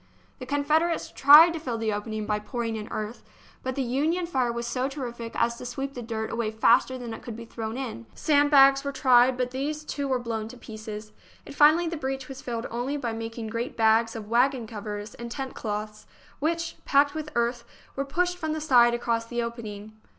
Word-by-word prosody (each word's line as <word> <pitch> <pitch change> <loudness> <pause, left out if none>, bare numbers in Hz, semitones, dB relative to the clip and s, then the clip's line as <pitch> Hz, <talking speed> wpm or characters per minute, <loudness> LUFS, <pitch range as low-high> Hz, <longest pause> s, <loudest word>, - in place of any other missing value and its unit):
The 255 - -8
Confederates 305 +4 +1
tried 300 +5 +9
to 330 - -4
fill 250 -7 -3
the 220 -1 -1
opening 215 +1 -4
by 210 0 0
pour 235 +3 -4
ing 225 -1 -2
in 215 -1 -5
earth, 215 +2 -4 0.4
but 260 0 -3
the 275 - 0
Union 305 +8 0
fire 260 -8 0
was 235 0 -4
so 255 +3 -1
terrific 240 -4 -6
as 235 0 +1
to - - -7
sweep 270 +3 -4
the 245 - -6
dirt 225 -1 -4
away 230 -2 -1
faster 220 +4 +3
than 240 -2 -6
it - - -8
could 235 - -7
be 230 +1 -8
thrown 225 0 -5
in. 230 - -6
Sand 290 -1 +3
bags 275 -1 +6
were 280 - -2
tried, 255 -2 +4
but 250 -1 -1
these 295 +4 -3
too 285 -2 -3
were 260 -1 +1
blown 225 -3 -4
to 250 - -11
pieces, 215 -2 -8 0.3
and - - -9
finally 310 +4 +5
the 335 0 -3
breach 270 -2 -4
was 270 0 -8
filled 235 -2 -4
only 245 +5 -2
by 240 -5 -3
making 225 0 -5
great 230 +3 -4
bags 225 +1 +3
of 215 -2 -6
waggon 245 +2 +2
covers 210 -1 -6
and 235 0 -8
tent 265 +2 -5
cloths, 215 0 -5 0.3
which, 335 +2 -1
packed 285 +1 +3
with 310 -1 -5
earth, 235 0 0 0.3
were 275 - -1
pushed 355 +6 -1
from 315 -2 -2
the 315 - -2
side 245 -6 +5
across 230 -1 -1
the 240 0 -2
opening. 215 -3 -7
245 Hz, 215 wpm, -26 LUFS, 225-280 Hz, 0.4 s, tried